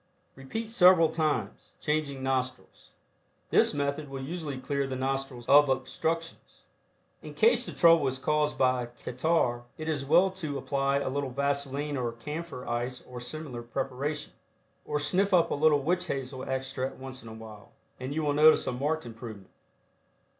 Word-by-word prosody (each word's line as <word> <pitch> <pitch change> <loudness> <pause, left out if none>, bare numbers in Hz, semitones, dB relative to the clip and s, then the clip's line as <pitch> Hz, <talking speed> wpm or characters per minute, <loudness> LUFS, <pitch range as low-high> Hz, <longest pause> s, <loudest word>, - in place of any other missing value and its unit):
Repeat 220 +12 -5
several 180 -6 +6
times, 150 -10 -2
changing 150 -3 -1
nostrils. 130 -1 -3 0.6
This - - +5
method 145 +1 -2
will 135 -1 -6
usually 155 -2 -4
clear 140 +1 -1
the 130 - -4
nostrils 135 -2 -3
of 145 0 +7
obstructions. 165 +5 -3 0.6
In - - -10
case 460 - +3
the - - -4
trouble 165 -4 +5
is 130 0 -1
caused 150 +2 0
by 130 -2 +2
catarrh 120 +1 0 0.2
it 155 - -6
is 150 -4 -1
well 180 +7 +4
to 155 -7 -4
apply 140 0 0
a 140 - -2
little 140 0 -2
vaseline 140 +2 -1
or 120 -2 -2
camphor 150 +2 -6
ice 120 +2 -3
or 125 -1 -8
similar 125 -1 -6
preparation. 135 +5 -4 0.5
Or 150 - -1
sniff 185 +6 +2
up 170 - +3
a - - +2
little 145 -1 +3
witch 180 +4 0
hazel 130 -3 -4
extract 130 0 -2
once 130 0 -9
in 115 - -11
a - - -8
while, 110 -2 -11 0.3
and 130 +2 -5
you 155 +2 -1
will 145 -1 +1
notice 155 +2 +6
a - - -1
marked 145 +5 -1
improvement. 110 -4 -9
140 Hz, 160 wpm, -29 LUFS, 130-155 Hz, 0.6 s, of